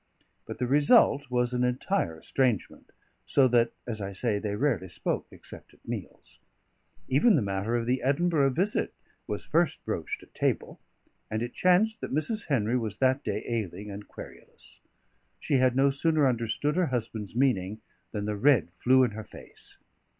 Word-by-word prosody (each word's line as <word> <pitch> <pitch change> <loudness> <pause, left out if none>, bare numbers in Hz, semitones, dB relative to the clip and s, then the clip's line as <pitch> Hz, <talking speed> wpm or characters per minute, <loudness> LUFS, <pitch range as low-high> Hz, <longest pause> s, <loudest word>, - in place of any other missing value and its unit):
But - - -6
the 125 - -1
result 145 0 +4
was 125 0 0
an 125 0 +1
entire 125 - -1
estrangement, 125 +3 -1 0.4
so 135 -2 +4
that 120 -1 +3
(as 110 -3 -4
I 100 0 -4
say) 105 +1 -1
they 105 -1 -3
rarely 110 - 0
spoke, - - -3
except - - -12
at - - -27
meals. - - -8 0.7
Even 160 - +4
the 140 - +2
matter 100 +4 -1
of 120 -1 -1
the 125 +2 0
Edinburgh 145 +1 +2
visit 185 +11 0 0.3
was - - -4
first - - 0
broached - - -4
at - - -20
table, - - -1 0.5
and 110 +2 -2
it 120 - -5
chanced 210 +5 +2
that - - -5
Mrs. 180 +9 -1
Henry 125 -4 +1
was 110 -3 -4
that 130 +3 +2
day - - -2
ailing 105 -3 -4
and 100 +1 -8
querulous. - - -12 0.6
She 140 - +1
had 130 -1 +3
no 135 +1 +4
sooner 150 +1 +2
understood 120 +5 -1
her 180 -2 +2
husband's 110 -4 -4
meaning 110 -6 +1 0.3
than 105 -1 -3
the 105 0 -2
red 110 - +3
flew 130 +1 +5
in 125 - +1
her 110 +1 -7
face. - - -11
125 Hz, 170 wpm, -28 LUFS, 110-140 Hz, 0.7 s, flew